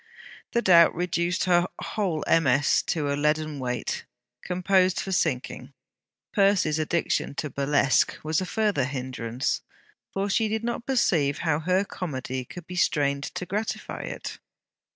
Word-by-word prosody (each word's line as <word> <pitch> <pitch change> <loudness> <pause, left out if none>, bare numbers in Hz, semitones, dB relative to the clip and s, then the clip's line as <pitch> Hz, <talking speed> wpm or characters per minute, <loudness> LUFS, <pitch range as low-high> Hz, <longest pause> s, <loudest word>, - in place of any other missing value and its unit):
The 235 - +1
doubt 170 -3 +6
reduced 175 +1 0
her 175 -1 +3
whole 185 -8 -2
MS. 145 -3 +3
to 145 -3 0
a - - 0
leaden 150 0 0
weight, 125 -3 -3 0.4
composed 185 0 +2
for 195 - -4
sinking. 130 -5 -1 0.6
Percy's 190 -6 +3
addiction 155 -2 0
to 150 -1 -3
burlesque 140 -1 +2
was 155 +2 0
a 185 - -3
further 205 - +1
hindrance, 130 -3 -3 0.5
for 195 +1 -1
she 220 +2 +2
did 220 +1 -2
not 235 0 -3
perceive 165 - +2
how 155 -2 +2
her 185 +4 +1
comedy 130 -9 -4
could 175 +6 -10
be 180 - -8
strained 140 -5 +1
to 180 - -5
gratify 210 +4 -3
it. - - -6
165 Hz, 140 wpm, -26 LUFS, 140-185 Hz, 0.6 s, doubt